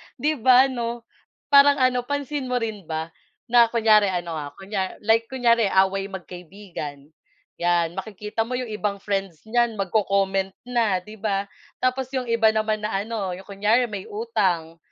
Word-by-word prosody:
Di 305 -1 -1
ba 255 +2 +7
'no 235 -1 -4 0.5
parang 285 0 +7
ano 250 -2 +1
pansin 285 -1 -3
mo 250 - -1
rin 220 -7 -3
ba 160 +1 -4 0.4
na 240 0 +7
kunyari 220 -2 +4
ano 175 -2 -3
ha 145 -1 -6
kunya 195 +1 -4
like 225 +2 +3
kunyari 235 -2 +2
away 195 0 +2
magkaibigan 180 -6 -8 0.5
'yan 175 0 +1
makikita 210 +2 -3
mo 245 - -6
'yong 250 -2 -3
ibang 210 -2 -3
friends 195 -5 -3
niyan 240 0 +2
mag-co-comment 195 -1 0 0.2
na 220 -7 +1
'di 215 +3 -12
ba. 200 -1 -2 0.3
Tapos 255 +1 +1
'yong 255 -2 -2
iba 225 -1 +3
naman 215 -1 -1
na 215 - -3
ano 205 -4 -3
'yong 185 - -8
kunyari 215 +5 +2
may 205 -2 -6
utang 190 -7 -1
210 Hz, 155 wpm, -24 LUFS, 190-235 Hz, 0.5 s, ba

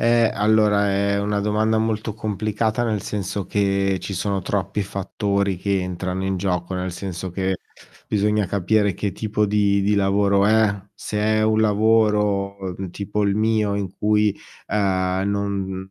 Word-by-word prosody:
Eh, 115 -1 +4
allora, 105 -1 +3
è 100 +1 +1
una 105 0 0
domanda 105 +2 +1
molto 110 -1 -1
complicata, 110 +1 -1
nel 110 -4 -1
senso, 100 -2 -3
che 95 -1 +1
ci 100 - -6
sono 100 +1 -1
troppi 100 +2 -1
fattori 100 0 -1
che 100 +1 0
entrano 90 +1 -3
in 95 0 -1
gioco, 90 -1 -2
nel 90 0 -3
senso 95 0 -5
che 95 +1 -1 0.5
bisogna 105 0 +1
capire 100 +2 +1
che 100 +2 -2
tipo 105 +2 -1
di 100 -1 +2
di 105 +1 +2
lavoro 100 0 +3
è, 110 -1 +4 0.2
se 105 - -5
è 110 +1 +2
un 110 0 +2
lavoro, 105 -2 +2 0.2
mhmm, 95 -2 -5
tipo 100 +3 -2
il 100 -1 +1
mio, 110 0 +1
uhm, - - -1
in 100 -2 -2
cui 105 -1 +2 0.3
non 95 0 -1
100 Hz, 155 wpm, -22 LUFS, 95-105 Hz, 0.5 s, Eh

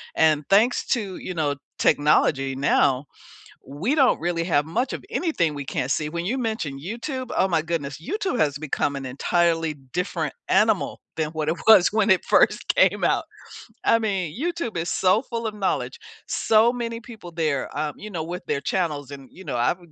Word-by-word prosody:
And 155 -2 +3
thanks 220 +5 +3
to, 205 -7 -1
you 185 - -6
know, 150 -4 0 0.2
technology 135 -2 +3
now, 135 0 +2 0.6
we 165 - -1
don't 270 -4 +3
really 170 0 -1
have 155 -4 +2
much 245 +11 -1
of - - -6
anything 315 - 0
we 145 -1 -5
can't 130 -1 -3
see. 150 +1 -1
When 170 +2 -4
you 245 +7 0
mention 220 - -3
YouTube, 245 - -5
oh - - +4
my 165 -3 +1
goodness, 155 -4 -4
YouTube 385 - -2
has 145 -2 +1
become 145 -1 -1
an 135 -1 -5
entirely 165 +4 +1
different 145 +7 -4
animal - - +2 0.2
than 155 -1 0
what 155 -1 -3
it 165 - +1
was 220 -5 +8
when 215 -1 +2
it 190 - +4
first - - +3
came - - +3
out. - - +2 0.6
I 230 - +5
mean, 195 -5 -2
YouTube 335 - -2
is 170 +1 -2
so 190 +6 +2
full 230 -3 -4
of 215 - -3
knowledge. 200 -2 -2 0.3
So 225 +2 +3
many 230 -2 -4
people 225 -7 -11
there, 155 -6 -2
um, 150 0 -2
you 215 - -9
know, 165 -5 -3
with 180 +2 -6
their 140 - -1
channels 150 -5 -2
and, 135 -2 -10
you 190 - -13
know, - - -3
I've, 120 +9 +1
170 Hz, 185 wpm, -24 LUFS, 145-220 Hz, 0.6 s, was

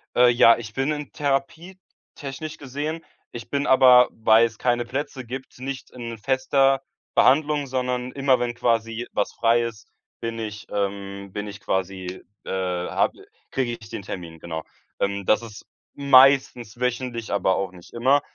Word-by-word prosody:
Äh, 125 0 +6
ja, 120 -1 +6
ich 110 -2 -8
bin 135 +4 0
in 150 -1 -5
Therapie, 150 +6 -2 0.4
technisch 150 +3 -7
gesehen. 145 +4 -5 0.3
Ich 120 - -9
bin 140 0 -1
aber, 125 -2 +7
weil's 115 0 +3
keine 120 -1 +1
Plätze 130 0 -4
gibt, 130 +1 -8
nicht 135 0 -6
in 115 -2 -7
fester 135 +3 +2 0.3
Behandlung, 145 +1 +4
sondern 125 -1 -2
immer 135 -2 +2
wenn 120 -1 -1
quasi 115 0 -1
was 105 - 0
frei 115 0 +3
ist, 115 -3 -6 0.3
bin 115 0 -4
ich 105 -1 -6
ähm, 100 -1 -4
bin 105 +1 -5
ich 100 -1 -9
quasi, 95 -1 -3 0.2
äh - - -9
habe 90 -2 -1 0.3
kriege 125 -3 -1
ich 110 - -13
den 115 - -5
Termin, 85 -4 -8
genau. 80 -1 -5 0.4
Ähm 100 0 -1
das 110 - +3
ist 110 -3 -11 0.3
meistens 130 -4 +4
wöchentlich, 125 -2 -2
aber 95 -2 +2
auch 95 -2 -2
nicht 90 -2 -16
immer. 130 +4 +3
120 Hz, 155 wpm, -24 LUFS, 105-135 Hz, 0.4 s, aber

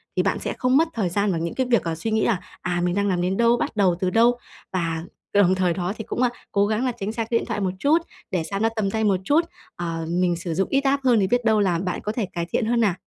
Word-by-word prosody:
thì - - +2
bạn - - 0
sẽ - - -3
không 255 +1 +3
mất 325 +2 +4
thời 210 -6 -1
gian 200 +3 +1
vào 170 - -1
những 165 0 -3
cái 260 - +1
việc, 235 -3 +3
à, 165 -1 -2
suy 220 +8 -4
nghĩ 220 0 +2
là 215 -6 +1 0.2
"À, 175 -1 -1
mình 175 0 0
đang 200 0 +1
làm 180 -3 0
đến 185 +2 0
đâu? 235 +1 +4
Bắt - - -3
đầu 190 -4 +3
từ 185 - +1
đâu?" 235 +4 +4 0.4
Và 165 -3 -1 0.3
đồng 190 -2 +4
thời 180 -2 +1
đó 180 +2 -2
thì 220 - -5
cũng, 240 - -3
a, 250 - +4 0.2
cố 200 0 +3
gắng 220 +4 0
là 255 - +1
tránh 200 +2 -2
xa 230 +1 -2
cái 230 +1 0
điện - - -6
thoại 225 -3 -3
một 190 -2 0
chút, 290 +7 +4 0.3
để 180 -3 0
xa 195 +4 -4
nó 225 +2 +2
tầm 205 -3 0
tay 220 +1 -1
một 200 -3 +2
chút. 305 - +3 0.3
Ờ, 165 -1 -3
mình 175 0 +1
sử 170 0 -4
dụng 190 +4 0
ít 275 0 +1
app 275 0 +1
hơn 245 -4 +4
thì 195 - +2
biết 245 +3 +1
đâu 220 -1 +4
là 180 -5 +2
bạn 180 0 -3
có 210 - -2
thể 220 -1 -2
cải 170 -1 -2
thiện 220 +7 -1
hơn 235 +1 +1
nè. 205 -5 +3
200 Hz, 310 wpm, -23 LUFS, 180-230 Hz, 0.4 s, mất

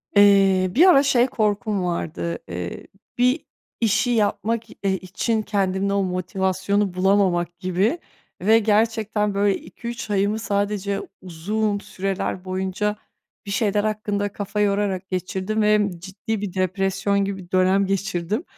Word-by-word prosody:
Eee, 195 -2 +5
bir 325 +8 +7
ara, 335 -7 +7
şey, 255 -3 +3
korkum 210 -3 0
vardı, 155 - -3
eee, 85 0 -6 0.3
bir 250 +5 +2 0.4
işi 220 +2 +2
yapmak 225 +1 0
i - - -13
eee, 195 -1 +2
için 215 +5 -1
kendimde 200 -1 0
o 200 0 +2
motivasyonu 190 +2 -1
bulamamak 185 -2 +1
gibi 190 - 0 0.4
ve 220 +4 +5
gerçekten 215 -1 +1
böyle 200 0 +2
2-3 235 +5 -7
ayımı 205 +2 +1
sadece 200 -1 -1 0.2
uzun 205 +5 -2
süreler 190 -1 -3
boyunca 190 +3 -2 0.5
bir 200 - -5
şeyler 205 0 +1
hakkında 210 -1 -1
kafa 205 +1 -4
yorarak 200 -2 0
geçirdim 190 +3 -2
ve 210 0 +4 0.2
ciddi 200 +4 -5
bir 200 -4 -4
depresyon 195 +1 0
gibi 195 0 -3
bir 175 - -26
dönem 185 +1 +3
geçirdim. 195 - -2
200 Hz, 130 wpm, -23 LUFS, 185-215 Hz, 0.5 s, bir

